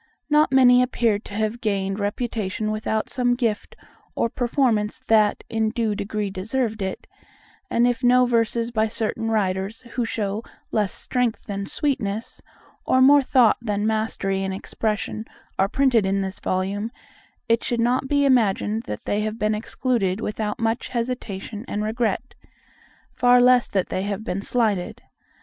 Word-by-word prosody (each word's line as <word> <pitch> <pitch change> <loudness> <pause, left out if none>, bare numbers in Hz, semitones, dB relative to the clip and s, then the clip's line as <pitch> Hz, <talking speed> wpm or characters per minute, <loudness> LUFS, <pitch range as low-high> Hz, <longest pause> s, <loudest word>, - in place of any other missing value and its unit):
Not 300 0 +4
many 250 -2 +6
appear 235 -4 +1
to 205 - -12
have 220 +2 -1
gained 195 -2 -1
reputation 215 -1 -2
without 215 0 -1
some 245 -2 +1
gift 230 -4 -2 0.4
or 230 - +1
performance 240 -3 0
that, 220 -5 +2
in 220 -1 0
due 225 -1 -1
degree, 205 0 -3
deserved 220 +3 -2
it; 190 -1 -4 0.6
and 235 - +3
if 245 +1 0
no 250 +1 +5
verses 230 0 0
by 220 -1 +1
certain 225 +1 -2
writers 195 0 -1
who 245 - 0
show 210 -2 -2 0.3
less 210 -3 +1
strength 250 -3 -1
than 200 -1 -4
sweetness, 225 -7 -2 0.4
or 260 - +2
more 280 +2 +7
thought 255 -4 +4
than 210 -2 -1
mastery 215 -3 -1
in 190 0 -2
expression, 215 +2 -3 0.4
are 195 +1 +3
printed 245 -5 +3
in 195 +1 +1
this 190 0 -4
volume, 195 +4 -2 0.6
it 230 0 +2
should 240 - -1
not 250 +3 +1
be 285 0 +2
imagined 220 -4 +2
that 105 - -5
they 205 - -1
have 215 +1 -3
been 215 -1 +1
excluded 215 -3 -1
without 210 -1 -3
much 225 +1 -1
hesitation 230 -4 -4
and 210 - -2
regret, 225 +2 -1 0.8
far 245 0 +4
less 250 0 +5
that 190 -2 -1
they 185 - -2
have 200 +1 -3
been 195 -3 -3
slighted. 210 -5 -1
220 Hz, 155 wpm, -23 LUFS, 205-245 Hz, 0.8 s, more